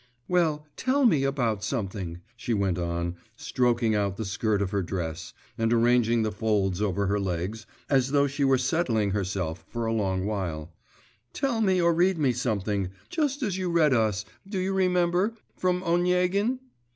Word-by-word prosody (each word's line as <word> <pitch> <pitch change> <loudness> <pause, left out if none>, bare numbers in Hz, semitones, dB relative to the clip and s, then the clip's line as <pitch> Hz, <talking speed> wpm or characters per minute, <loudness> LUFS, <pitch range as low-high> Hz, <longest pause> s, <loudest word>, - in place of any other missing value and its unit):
'Well, 160 -4 +1
tell 265 +1 +2
me 155 - +4
about 120 -7 0
something,' 95 -7 -3
she 120 -1 -2
went 95 -3 0
on, 85 0 -2 0.2
stroking 120 -2 +1
out 100 -2 0
the 110 - -3
skirt 105 +2 0
of 100 -2 -1
her 100 - 0
dress, 85 -3 -4 0.3
and 115 0 +1
arranging 120 -1 +3
the 110 - -1
folds 100 -3 0
over 100 -1 0
her 100 +1 +1
legs, 95 +3 -3 0.2
as 135 -2 +2
though 140 0 +3
she 140 +1 -2
were 135 -1 +4
settling 125 - +1
herself 95 -4 -2
for 120 -1 -3
a 115 - 0
long 95 -4 0
while; 85 -6 -3 0.6
'tell 270 -5 0
me 190 -3 +3
or 170 -1 +4
read 180 +2 +3
me 140 -5 +2
something, 105 -5 -1 0.2
just 290 -3 -1
as 195 -5 -1
you 185 -1 -1
read 160 -4 +4
us, 105 -3 +1 0.2
do 200 - -3
you 190 +1 0
remember, 180 +2 +2 0.2
from 180 0 0
Oniegin. 180 +6 +2
115 Hz, 170 wpm, -27 LUFS, -, 0.6 s, me